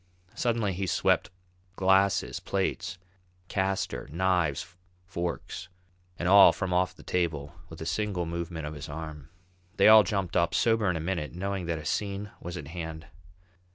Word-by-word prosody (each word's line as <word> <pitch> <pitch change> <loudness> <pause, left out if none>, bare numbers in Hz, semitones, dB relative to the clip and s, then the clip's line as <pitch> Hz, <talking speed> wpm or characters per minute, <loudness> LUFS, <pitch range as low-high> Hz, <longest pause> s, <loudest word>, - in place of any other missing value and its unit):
Suddenly 115 -4 0
he 95 +2 -2
swept - - +2 0.5
glasses, 95 0 +2
plates, 90 - -2 0.5
castor, 95 0 -1
knives, 90 -2 0 0.3
forks, 90 0 -4 0.5
and 85 - -2
all 100 +1 +9
from 95 -3 -3
off 90 0 +1
the - - -15
table 80 -4 -1 0.2
with 80 - -10
a - - -4
single 90 +1 -1
movement 85 -1 -4
of 75 - -5
his 75 +1 -8
arm. 75 -1 -7 0.5
They - - +6
all 110 0 +10
jumped 95 -4 -2
up, 85 0 +2
sober 115 -4 +3
in 90 - 0
a - - -2
minute, 80 -2 -3
knowing 95 0 -3
that 85 -1 -1
a 75 - -8
scene 100 +4 -2
was 85 +1 -6
at 75 -4 -7
hand. 80 -1 -6
90 Hz, 155 wpm, -28 LUFS, 80-95 Hz, 0.5 s, all